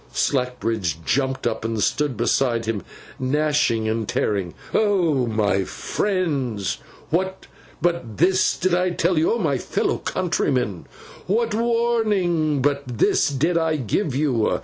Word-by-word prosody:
Slackbridge 115 - -1
jumped 130 -1 0
up - - -1
and 115 -1 -2
stood 135 +4 0
beside 120 0 +1
him, 110 -3 -2 0.4
gnashing 140 -4 +1
and 110 -1 -1
tearing. 95 -4 -1 0.2
'Oh, 175 - +2
my 105 -3 +1
friends, 140 - -2 0.3
what 190 +3 -1 0.4
but 170 -11 -1
this 185 +2 +3
did 185 -1 0
I 180 +1 +2
tell 175 -1 +1
you? 160 - +2
Oh, - - 0
my 150 - 0
fellow - - -1
countrymen, 130 - -1 0.4
what 225 +3 +1
warning 210 - +1
but 145 0 +2 0.2
this - - +3
did 160 +5 +1
I 160 -1 +1
give 140 - -1
you? 130 -6 +1
145 Hz, 130 wpm, -22 LUFS, 115-180 Hz, 0.4 s, this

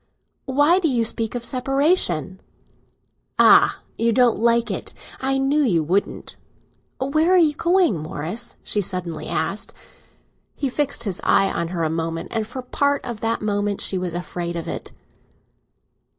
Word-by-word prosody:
"Why 290 +7 +4
do 350 - +1
you 240 -5 +1
speak 225 +1 -2
of 240 -1 -3
separation?" 255 - 0 1.0
"Ah! - - +6 0.2
you 230 0 +2
don't 245 0 +3
like 235 +1 +2
it; - - -6 0.2
I 270 +1 0
knew 275 +3 +2
you 180 - +2
wouldn't!" 185 +6 -2 0.6
"Where 310 +6 +1
are 370 - +6
you 320 -4 +4
going, 340 - +2
Morris?" 155 +7 -5
she 210 - 0
suddenly 180 -3 -3
asked. - - -2 0.8
He 275 - -2
fixed 280 +2 0
his 195 -5 -4
eye 195 - +3
on 170 - -2
her 170 0 -4
for - - +1
a 160 - +1
moment, 165 0 -3
and 220 -2 -2
for 245 - -10
a 255 - -4
part 285 +3 0
of 235 -3 -5
that 225 -1 -1
moment 205 -1 -1
she 190 - 0
was 180 -2 -4
afraid 175 -1 -4
of 170 - -5
it. - - -5
230 Hz, 165 wpm, -22 LUFS, 180-275 Hz, 1.0 s, Ah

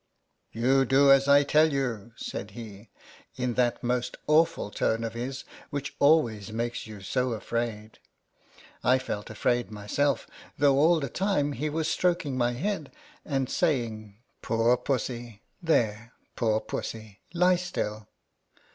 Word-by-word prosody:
" - - -49
You 130 +4 +3
do 135 +2 +5
as 135 0 +5
I 140 0 +6
tell 155 +2 +4
you," 120 -5 -3
said 100 - -6
he, 105 -2 -10 0.5
in 125 -1 -1
that 120 0 0
most 125 0 -1
awful 150 -8 +2
tone 110 +2 0
of 115 -1 -3
his, 125 +3 -5 0.3
which 145 0 -5
always 120 -9 +3
makes 120 +1 -3
you 105 -2 -10
so 125 +6 -1
afraid. 110 -1 -4 0.8
I 130 - +4
felt 110 -5 -5
afraid 120 +2 0
myself, 105 +7 -1 0.3
though 140 -1 +4
all 165 +3 +5
the 140 - -3
time 150 - 0
he 145 +3 -2
was 160 +1 -1
stroking 170 -6 0
my 120 -1 +1
head, 160 +2 -3 0.3
and 135 -3 -1
saying, 115 - -1
" - - -45
Poor 115 +1 +2
pussy, 120 -3 -4 0.2
there, 120 -8 0 0.2
poor 110 -2 +1
pussy, 110 -2 -6 0.2
lie 180 +1 +4
still." 110 - -4
125 Hz, 145 wpm, -27 LUFS, 110-145 Hz, 0.8 s, I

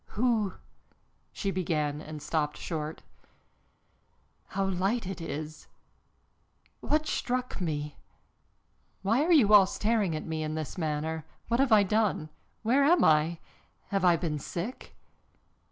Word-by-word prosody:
"Who 220 -4 +2 0.4
" - - -42
she 195 - -2
began 155 -5 -1
and 155 -1 -8
stopped 150 -1 -1
short. 155 -2 -5 1.4
"How 195 +1 -1
light 195 +5 0
it 190 -2 -5
is! 155 -1 -6 1.1
What 305 +1 0
struck 250 -7 -2
me? 150 -3 -3 1.1
Why 225 +8 +3
are 345 - +1
you 240 -11 +6
all 200 -2 +8
staring 210 -5 0
at 155 - -5
me 160 -1 -3
in 155 0 -3
this 155 -3 -4
manner? 160 -1 -2 0.3
What 235 +1 +1
have 270 -2 +3
I 210 -2 +7
done? 200 -6 0 0.3
Where 255 +5 +3
am 340 +5 +5
I? 160 +2 +4 0.5
Have 195 -2 0
I 175 -2 +6
been 155 -3 -2
sick?" 180 - -6
180 Hz, 135 wpm, -29 LUFS, 155-220 Hz, 1.4 s, all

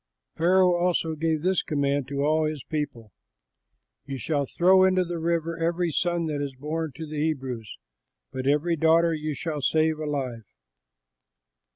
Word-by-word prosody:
Pharaoh 180 +2 +4
also 175 -2 +1
gave 160 0 -1
this 185 +1 +2
command 140 -3 -1
to 140 0 -2
all 155 +1 +2
his 155 -3 -3
people, 125 -8 -4 1.0
"You 135 -1 -4
shall 145 0 -1
throw 185 +5 +4
into 185 -1 +3
the 170 -1 -4
river 165 0 -1
every 170 +1 0
son 175 +1 0
that 150 -2 -2
is 140 -2 -4
born 155 +3 -3
to 160 - -6
the 150 -1 -4
Hebrews, 130 -8 -3 0.5
but 130 0 -4
every 150 +4 +2
daughter 165 +1 +4
you 155 -1 -3
shall 150 0 -4
save 155 +2 +2
alive." 135 -7 -3
155 Hz, 155 wpm, -26 LUFS, 145-170 Hz, 1.0 s, Pharaoh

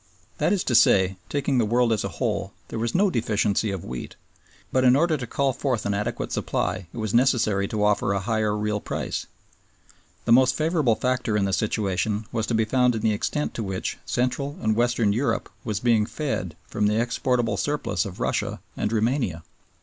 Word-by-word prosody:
That - - +2
is 200 -3 +1
to 125 - -1
say, 95 -4 +5
taking 140 -2 0
the - - +3
world 120 +1 +2
as 105 - -1
a - - -1
whole, - - -1 0.2
there - - -4
was 115 +1 -2
no 195 +1 +3
deficiency 110 - +1
of 95 -3 -4
wheat, 60 -1 -6 0.6
but 130 - +2
in 125 0 +6
order 160 +2 +3
to 125 -5 -5
call 135 +1 0
forth 125 -3 -1
an 100 - 0
adequate 100 +1 -3
supply 90 -2 -2
it - - -11
was 110 -2 -2
necessary 115 -5 +3
to 105 0 -1
offer 105 -1 +2
a 100 - +1
higher 105 +1 0
real 105 0 -1
price. - - -4 1.0
The - - +1
most 130 +2 +6
favorable 155 -7 +2
factor 125 -4 0
in 100 - +1
the 95 - -1
situation 105 0 0
was 110 -2 -1
to 115 - 0
be 110 0 +2
found 125 +1 +2
in 110 - -3
the 110 0 +2
extent 150 +8 -2
to 115 - -3
which 95 -2 -3
Central 135 +3 -1
and 110 0 +2
Western 120 -3 +2
Europe 115 0 -1
was 105 -2 -2
being 115 -3 +2
fed 95 - -3
from 105 0 0
the 105 +1 +2
exportable 120 -1 0
surplus 145 +8 -1
of 95 -4 -8
Russia - - -1 0.2
and 105 - -1
Roumania. 115 - 0
115 Hz, 195 wpm, -25 LUFS, 105-125 Hz, 1.0 s, in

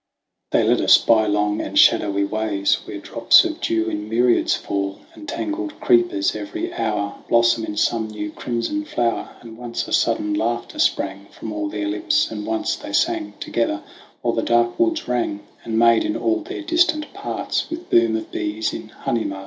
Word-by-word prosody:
They - - +2
led - - +3
us - - +7
by 110 -2 +3
long 105 0 +1
and - - -4
shadowy 100 -1 +4
ways 100 -1 0
Where - - -7
drops - - +4
of - - -4
dew 110 -1 0
in 105 -1 -4
myriads 120 +2 +3
fall, 100 0 -3
And 310 - -10
tangled 310 +1 -4
creepers 355 -2 +2
every 340 +3 -5
hour 105 -2 -2
Blossom 115 -1 +3
in 105 - -6
some 110 +1 +1
new 105 -1 -5
crimson 125 - -3
flower, 120 - -2
And 115 -1 -11
once 120 -1 -4
a - - -5
sudden 105 0 +1
laughter 120 +3 -2
sprang 100 +1 0
From 110 - -7
all 105 -1 -3
their 105 0 -3
lips, 105 +2 +1
and 105 -1 -5
once 110 0 -1
they - - -9
sang 105 0 0
Together, 110 -3 -1 0.4
while - - +1
the - - 0
dark 120 0 +1
woods 335 -2 +1
rang, 120 -5 -1 0.2
And 110 -1 -2
made 115 0 +5
in 320 0 -1
all 340 0 +1
their 355 +2 -7
distant 330 -2 +1
parts, - - -3
With 330 +1 -7
boom 115 -1 +4
of 110 - -5
bees 105 +1 -2
in - - -6
honey 115 -1 -2
marts, - - -3
VOL. 95 - -7
115 Hz, 190 wpm, -21 LUFS, -, 0.4 s, us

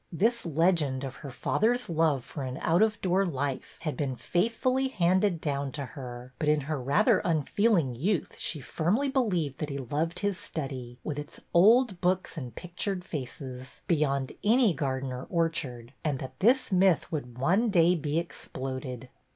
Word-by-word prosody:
This 225 +4 +1
legend 155 -4 +2
of 135 -1 -6
her 140 - -8
father's 240 - +1
love 160 -6 +2
for 145 - -7
an 130 0 -4
out 170 +4 +3
of 215 -1 +3
door 185 +1 +2
life 140 -6 -3
had 155 -3 -2
been 140 -4 -2
faithfully 230 - +1
handed 185 -4 +2
down 140 -3 -2
to 145 -2 -3
her, 125 -2 -9
but 150 - +1
in 150 0 +3
her 145 0 -3
rather 140 +3 +4
unfeeling 165 - +2
youth 175 - -1
she 150 - -1
firmly 205 - 0
believed 180 - 0
that 150 - -3
he 140 - -3
loved 145 +6 -2
his 200 -2 0
study, 130 -5 -5
with 150 -2 -3
its 145 - -8
old 210 +2 +5
books 185 0 0
and 125 -8 -6
pictured 180 +2 -3
faces, 130 -3 -7
beyond 140 -5 +1
any 225 -2 +4
garden 135 -2 -2
or 125 +1 -6
orchard, 140 -8 -2
and 150 -4 0
that 130 0 -8
this 250 +4 +3
myth 185 -3 +3
would 125 -7 -4
one 190 - +2
day 175 -3 +5
be 155 -2 -1
exploded. 130 -6 -5
155 Hz, 165 wpm, -29 LUFS, 135-185 Hz, -, old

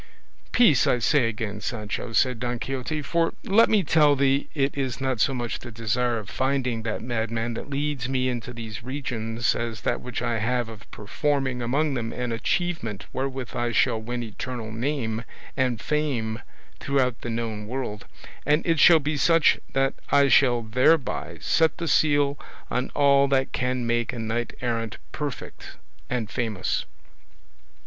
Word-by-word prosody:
"Peace, 185 - +5
I - - +3
say 120 +2 +3
again, 110 -2 -4
Sancho," 105 +1 -4
said 125 0 +2
Don 120 0 -2
Quixote, 135 +5 -3
"for 165 +2 0
let 225 +4 +5
me 210 -3 +3
tell 150 -4 +4
thee 140 0 +2
it 140 -1 +1
is 135 -3 -2
not 130 -3 -1
so - - +3
much 120 -3 -3
the 120 - -9
desire 115 +2 0
of 105 -3 -6
finding 130 -2 -1
that 110 -1 -3
madman 115 -1 -2
that 115 - -7
leads 140 -3 -2
me 130 -1 +1
into 125 -1 -3
these 115 -2 -7
regions 120 -3 -2
as 115 -2 -4
that - - -1
which 125 -2 -5
I 115 -1 0
have 120 +1 0
of 110 -3 -12
performing 130 +3 -1
among 140 +5 +1
them 115 -3 -3
an 125 -1 -3
achievement 115 - -2
wherewith 130 -1 -3
I 120 -1 0
shall 115 -1 +2
win 120 +2 -4
eternal 115 0 -6
name 115 -1 -2 0.3
and 125 -4 +1
fame 125 -6 -1 0.4
throughout 130 -4 0
the 120 - -4
known 115 -2 -3
world; 115 -4 -4 0.4
and 150 +2 +2
it 165 -2 +2
shall 165 +2 +8
be 150 0 -2
such 165 +2 +4
that 135 0 +2 0.2
I 140 -1 +5
shall 125 -3 +4
thereby 130 +7 +1
set 160 -1 +2
the 170 -2 -3
seal 145 -2 +3 0.3
on 125 +1 -1
all 140 -1 +5
that 135 -1 +1
can 125 -1 -1
make 120 0 0
a - - -6
knight 115 +1 -2
errant 115 -3 -2
perfect 145 -3 -6 0.3
and 120 -3 -1
famous." 110 -4 -2
125 Hz, 165 wpm, -25 LUFS, 115-140 Hz, 0.4 s, shall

